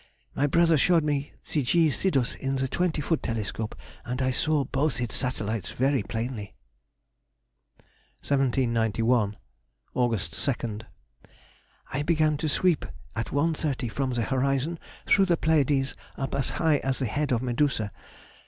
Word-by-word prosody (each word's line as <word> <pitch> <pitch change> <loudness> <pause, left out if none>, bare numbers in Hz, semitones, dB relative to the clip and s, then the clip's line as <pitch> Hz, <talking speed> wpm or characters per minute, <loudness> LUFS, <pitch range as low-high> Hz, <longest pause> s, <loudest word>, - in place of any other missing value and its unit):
My 145 - +1
brother 165 +1 +4
showed 170 +2 +4
me 145 -1 -1 0.2
the 150 - +2
G. 160 +4 +3
Sidus 135 -8 +1
in 135 0 -2
the 135 0 0
twenty 160 +2 0
foot 165 +2 0
telescope, 110 -1 -3 0.3
and 125 +1 -4
I 130 0 +2
saw 150 +3 +1
both 135 +2 0
its 120 -2 -2
satellites 115 -6 -2
very 135 0 +2
plainly. 110 -1 -4 1.7
1791. 115 -5 +1 0.6
Aug. 120 -1 +2 0.6
2nd.—I 105 - -11
began 155 -1 +2
to 155 +1 -1
sweep 175 +2 +2 0.3
at 115 - -2
1.30, 145 -5 0
from 135 +5 -1
the 120 -1 0
horizon 135 +5 0 0.3
through 195 - +5
the 175 -3 +2
Pleiades 145 -4 +2 0.2
up 135 - -3
as 140 -1 0
high 160 -3 +3
as 135 -1 -1
the 130 - -1
head 145 +6 -1
of 120 0 +1
Medusa. 120 -4 0
135 Hz, 135 wpm, -27 LUFS, 120-150 Hz, 1.7 s, through